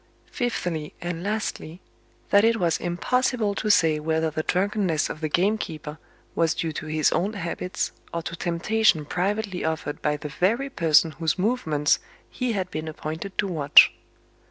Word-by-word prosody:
Fifthly, 175 Hz, -, -3 dB
and 175 Hz, -1 st, -4 dB
lastly: 200 Hz, -4 st, -3 dB, 0.5 s
that 200 Hz, +1 st, +6 dB
it 230 Hz, 0 st, +4 dB
was 170 Hz, -3 st, +1 dB
impossible 215 Hz, +4 st, 0 dB
to 215 Hz, -, -2 dB
say 160 Hz, -6 st, +4 dB
whether 160 Hz, +1 st, 0 dB
the 155 Hz, -, -2 dB
drunkenness 185 Hz, -3 st, 0 dB
of 155 Hz, -, -9 dB
the 155 Hz, -, -1 dB
gamekeeper 160 Hz, -5 st, -1 dB, 0.3 s
was 165 Hz, -2 st, +1 dB
due 165 Hz, -2 st, -2 dB
to 155 Hz, -, -6 dB
his 155 Hz, 0 st, +2 dB
own 200 Hz, +5 st, 0 dB
habits, 185 Hz, 0 st, -3 dB, 0.2 s
or 170 Hz, -1 st, -3 dB
to 170 Hz, -, -5 dB
temptation 175 Hz, 0 st, +1 dB
privately 195 Hz, +3 st, -2 dB
offered 155 Hz, -2 st, -3 dB
by 150 Hz, 0 st, 0 dB
the 150 Hz, 0 st, -7 dB
very 230 Hz, -, 0 dB
person 160 Hz, -, +4 dB
whose 160 Hz, -1 st, -1 dB
movements 180 Hz, -9 st, +1 dB, 0.3 s
he 250 Hz, -2 st, -2 dB
had 185 Hz, -3 st, -3 dB
been 155 Hz, +1 st, -4 dB
appointed 160 Hz, +5 st, -6 dB
to 210 Hz, -, +2 dB
watch. 150 Hz, -6 st, +6 dB
170 Hz, 155 wpm, -25 LUFS, 155-205 Hz, 0.5 s, that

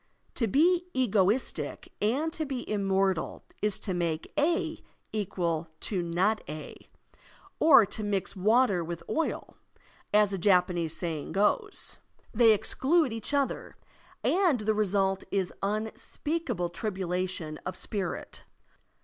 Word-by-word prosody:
To 230 Hz, -, 0 dB
be 345 Hz, -, +3 dB
egoistic 220 Hz, -2 st, +1 dB
and 275 Hz, +10 st, +1 dB
to 315 Hz, -, -2 dB
be 270 Hz, -4 st, -4 dB
immortal 195 Hz, -3 st, 0 dB, 0.2 s
is 210 Hz, -2 st, +1 dB
to 190 Hz, -, -2 dB
make 165 Hz, -2 st, -2 dB
"a" 310 Hz, +3 st, 0 dB, 0.3 s
equal 175 Hz, -6 st, -1 dB
to 190 Hz, -4 st, -1 dB
"not 180 Hz, +6 st, +1 dB
a,*' 155 Hz, 0 st, -8 dB, 0.7 s
or 275 Hz, -8 st, +8 dB
to 210 Hz, +2 st, -4 dB
mix 200 Hz, -1 st, -1 dB
water 210 Hz, -1 st, +3 dB
with 170 Hz, 0 st, -6 dB
oil, 325 Hz, -, -2 dB, 0.5 s
as 210 Hz, -1 st, +4 dB
a 195 Hz, -, -2 dB
Japanese 180 Hz, -3 st, +2 dB
saying 160 Hz, -4 st, -4 dB
goes; 410 Hz, -, 0 dB, 0.4 s
they 230 Hz, 0 st, +6 dB
exclude 270 Hz, -, +2 dB
each 225 Hz, +2 st, -3 dB
other, 280 Hz, -2 st, -1 dB, 0.5 s
and 345 Hz, -, +3 dB
the 215 Hz, +1 st, +1 dB
result 195 Hz, -2 st, +1 dB
is 190 Hz, -3 st, -1 dB
unspeakable 215 Hz, -, -2 dB
tribulation 180 Hz, -5 st, -3 dB
of 185 Hz, -, -4 dB
spirit. 195 Hz, -5 st, -4 dB
205 Hz, 120 wpm, -29 LUFS, 180-250 Hz, 0.7 s, or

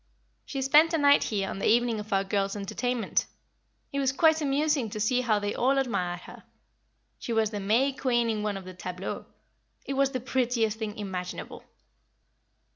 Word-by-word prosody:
She 270 Hz, -2 st, -3 dB
spent 310 Hz, +5 st, +5 dB
a -, -, +2 dB
night 285 Hz, -1 st, +5 dB
here 200 Hz, -3 st, -1 dB
on -, -, -5 dB
the -, -, 0 dB
evening 235 Hz, 0 st, +3 dB
of 210 Hz, +1 st, -8 dB
our 195 Hz, 0 st, +2 dB
girls' 195 Hz, 0 st, -1 dB
entertainment. 220 Hz, +4 st, -1 dB, 0.7 s
It 280 Hz, -, 0 dB
was 270 Hz, -1 st, +2 dB
quite 315 Hz, +3 st, +3 dB
amusing 285 Hz, -3 st, +1 dB
to 215 Hz, -, -6 dB
see 245 Hz, +4 st, +2 dB
how 225 Hz, -4 st, +2 dB
they 205 Hz, 0 st, -2 dB
all 270 Hz, +3 st, +2 dB
admired 180 Hz, -10 st, -1 dB
her. -, -, -12 dB, 0.8 s
She 235 Hz, -, -4 dB
was 220 Hz, -1 st, +2 dB
the 205 Hz, -, -3 dB
May 230 Hz, +8 st, +2 dB
Queen 240 Hz, -3 st, +1 dB
in 220 Hz, -2 st, -1 dB
one 210 Hz, -1 st, -2 dB
of 190 Hz, -, -9 dB
the 185 Hz, -, -8 dB
tableaux. 180 Hz, +1 st, -6 dB, 0.6 s
It 275 Hz, -, -3 dB
was 275 Hz, 0 st, +2 dB
the 260 Hz, -2 st, -3 dB
prettiest 240 Hz, -3 st, 0 dB
thing 215 Hz, -2 st, -4 dB
imaginable." 185 Hz, -3 st, -6 dB
230 Hz, 185 wpm, -28 LUFS, 205-270 Hz, 0.8 s, spent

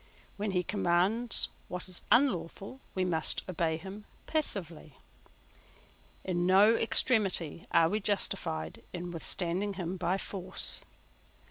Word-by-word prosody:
When 210 Hz, +1 st, -2 dB
he 180 Hz, -2 st, 0 dB
commands 200 Hz, +5 st, +1 dB, 0.2 s
what 180 Hz, +1 st, -5 dB
is 185 Hz, -1 st, +1 dB
unlawful 220 Hz, -2 st, +1 dB, 0.2 s
we 185 Hz, -1 st, +1 dB
must 160 Hz, -3 st, 0 dB
obey 165 Hz, -3 st, 0 dB
him 195 Hz, +5 st, -9 dB, 0.2 s
passively. 175 Hz, -, -3 dB, 1.3 s
In 175 Hz, -1 st, 0 dB
no 200 Hz, +4 st, +6 dB
extremity 200 Hz, -, +2 dB
are 165 Hz, -, +5 dB
we 210 Hz, +5 st, 0 dB
justified 80 Hz, -, -2 dB
in 175 Hz, 0 st, -5 dB
withstanding 180 Hz, +4 st, 0 dB
him 185 Hz, 0 st, -4 dB
by 185 Hz, +2 st, 0 dB
force. 190 Hz, -1 st, -1 dB
185 Hz, 115 wpm, -31 LUFS, 170-205 Hz, 1.3 s, no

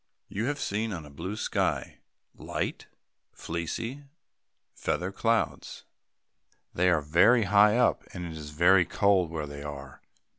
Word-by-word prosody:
You 110 Hz, +4 st, -2 dB
have 145 Hz, +2 st, -2 dB
seen 110 Hz, +2 st, -2 dB
on 85 Hz, -4 st, -6 dB
a 75 Hz, -, -13 dB
blue 95 Hz, +8 st, -5 dB
sky, 110 Hz, -, -2 dB, 0.3 s
light, -, -, -4 dB, 0.5 s
fleecy 115 Hz, -, -5 dB, 0.7 s
feather 90 Hz, +2 st, -2 dB
clouds. 110 Hz, -3 st, -1 dB, 0.9 s
They 90 Hz, +1 st, +2 dB
are 85 Hz, -4 st, +3 dB
very 95 Hz, +11 st, +4 dB
high 105 Hz, +2 st, +5 dB
up, 125 Hz, -, +2 dB
and 90 Hz, -2 st, -6 dB
it 85 Hz, -, -6 dB
is 75 Hz, -2 st, -8 dB
very 90 Hz, +5 st, +5 dB
cold 95 Hz, -2 st, +2 dB
where 80 Hz, -2 st, -4 dB
they 70 Hz, 0 st, -8 dB
are. 70 Hz, -2 st, -8 dB
90 Hz, 140 wpm, -28 LUFS, 80-105 Hz, 0.9 s, high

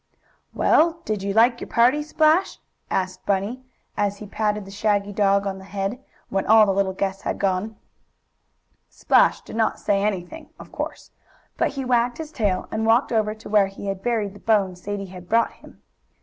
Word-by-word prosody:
"Well, 335 Hz, +1 st, +2 dB
did 215 Hz, -2 st, -2 dB
you 200 Hz, +1 st, -2 dB
like 235 Hz, +2 st, +4 dB
your -, -, -5 dB
party, 250 Hz, +5 st, +3 dB
Splash?" 310 Hz, +4 st, +2 dB, 0.3 s
asked 185 Hz, 0 st, -2 dB
Bunny, 205 Hz, +6 st, -1 dB, 0.3 s
as 205 Hz, -1 st, -1 dB
he 210 Hz, -, -9 dB
patted 210 Hz, 0 st, -2 dB
the 195 Hz, -, -11 dB
shaggy 205 Hz, 0 st, 0 dB
dog 200 Hz, -1 st, +2 dB
on 190 Hz, -1 st, -3 dB
the -, -, -12 dB
head, 200 Hz, +6 st, -4 dB, 0.3 s
when 195 Hz, 0 st, 0 dB
all 220 Hz, 0 st, +7 dB
the 195 Hz, -, +1 dB
little 195 Hz, 0 st, +1 dB
guests 195 Hz, 0 st, -3 dB
had -, -, -3 dB
gone. 195 Hz, +3 st, -1 dB, 1.1 s
Splash -, -, +3 dB
did -, -, -10 dB
not 225 Hz, -1 st, 0 dB
say 200 Hz, -1 st, +1 dB
anything, 210 Hz, -, -3 dB
of -, -, -13 dB
course. -, -, -6 dB, 0.4 s
But -, -, 0 dB
he 270 Hz, -, -2 dB
wagged 245 Hz, -1 st, +1 dB
his 315 Hz, -1 st, -7 dB
tail, 205 Hz, -9 st, -1 dB
and 220 Hz, 0 st, -1 dB
walked 230 Hz, +4 st, +3 dB
over 215 Hz, -2 st, +1 dB
to 220 Hz, -, -12 dB
where 205 Hz, -2 st, +4 dB
he 195 Hz, +1 st, -10 dB
had 195 Hz, -1 st, -4 dB
buried 215 Hz, -3 st, -1 dB
the 205 Hz, -, -13 dB
bone 200 Hz, -5 st, +1 dB
Sadie 195 Hz, +2 st, -5 dB
had 180 Hz, -1 st, -12 dB
brought 230 Hz, 0 st, +3 dB
him. -, -, -18 dB
210 Hz, 190 wpm, -23 LUFS, 195-230 Hz, 1.1 s, all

